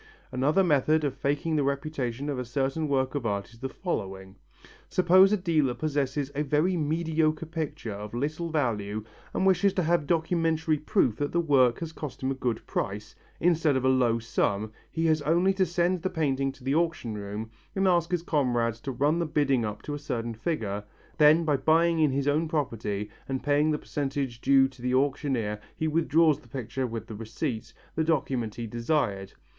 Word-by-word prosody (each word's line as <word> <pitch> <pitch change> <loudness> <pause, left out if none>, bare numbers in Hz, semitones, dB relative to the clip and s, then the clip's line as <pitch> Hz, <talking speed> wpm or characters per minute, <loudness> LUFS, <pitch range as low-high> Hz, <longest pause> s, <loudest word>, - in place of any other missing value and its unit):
Another 145 +9 +2
method 155 -1 +3
of 140 -3 0
faking 145 +4 -1
the 145 - +2
reputation 140 -2 -2
of 140 -3 -2
a - - -2
certain 135 +5 -1
work 130 -2 0
of 145 -4 -2
art 100 -3 -2
is 115 - -17
the 135 +1 -4
following. 95 - -4 0.5
Suppose 185 +2 +5
a 210 - +3
dealer 155 -9 +1
possesses 145 -1 -1
a 145 - -1
very 150 +5 +1
mediocre 160 0 0
picture 155 -9 -4
of 105 +3 -7
little 155 +6 -2
value 110 -9 -1 0.3
and - - 0
wishes 190 +1 +4
to 185 - 0
have 165 -2 +1
documentary 160 -2 +1
proof 125 -6 +1
that 145 0 -2
the 170 - +2
work 135 -7 +4
has 165 -1 -4
cost 150 -4 -7
him 130 - +1
a - - +1
good 125 -3 -3
price, 105 +2 -3 0.3
instead 165 -4 +3
of 130 0 0
a - - +5
low 125 -3 +3
sum, 110 -2 -1 0.2
he 165 0 -1
has 155 -1 +3
only 170 +6 +3
to 190 -1 +1
send 175 0 +1
the 185 - -1
painting 135 -5 0
to 135 - -18
the 135 +1 0
auction 165 -8 0
room 105 +2 -6 0.2
and 195 0 +2
ask 175 -2 +3
his 175 -2 -1
comrades 120 -8 0
to 135 - -4
run 145 +6 +1
the 170 - 0
bidding 145 -5 +2
up 105 -1 -4
to 145 - -4
a 145 - -4
certain 120 -5 -3
figure, 110 - -3 0.4
then 155 +2 +6
by 150 -2 +2
buying 165 +3 +3
in 155 -2 +4
his 135 +1 -1
own 155 +3 +2
property 115 - -2 0.2
and 130 -1 -2
paying 145 +2 +3
the 150 - +1
percentage 135 -5 -3
due 135 0 +5
to 130 -2 -16
the 125 +1 0
auctioneer 130 -6 0 0.2
he 160 - -1
withdraws 160 -1 +3
the - - -20
picture 130 +1 -3
with 115 -1 -5
the 115 - -9
receipt, 115 +2 -4 0.2
the 160 - 0
document 130 -8 0
he 120 - -4
desired. 115 -4 -1
145 Hz, 195 wpm, -27 LUFS, 120-160 Hz, 0.5 s, then